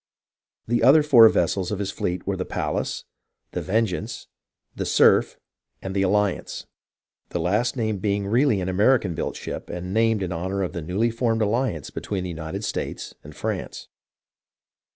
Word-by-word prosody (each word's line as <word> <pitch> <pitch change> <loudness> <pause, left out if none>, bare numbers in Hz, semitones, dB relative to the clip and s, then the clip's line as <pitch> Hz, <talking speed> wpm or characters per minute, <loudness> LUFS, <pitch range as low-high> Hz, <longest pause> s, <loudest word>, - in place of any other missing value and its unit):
The 120 +1 +1
other 150 +3 +6
four 120 -7 +8
vessels 90 0 0
of 105 - -1
his 100 0 -3
fleet 90 -3 -3
were 100 - -1
the 95 - -2
Pallas, - - -3 0.5
the - - -3
Vengeajice, 110 +2 -1 0.5
the - - -3
Cerf, - - +4 0.4
and 95 0 -6
the 100 - +2
Alliance, 100 0 0 0.6
the 85 - -3
last 105 +9 0
named 110 -4 -1
being 100 -1 0
really 115 +1 +2
an 90 - -3
American 100 +1 +2
built - - -3
ship - - -6
and 90 +2 -5
named 110 -2 +2
in 90 - -3
honour 95 +3 -2
of 90 - -4
the 85 - -4
newly 95 +9 0
formed 115 -1 0
alliance 105 - -1
between 95 -3 -4
the 90 - -4
United 80 +5 -5
States - - -4
and - - -12
France. - - -4
100 Hz, 165 wpm, -24 LUFS, 90-115 Hz, 0.6 s, four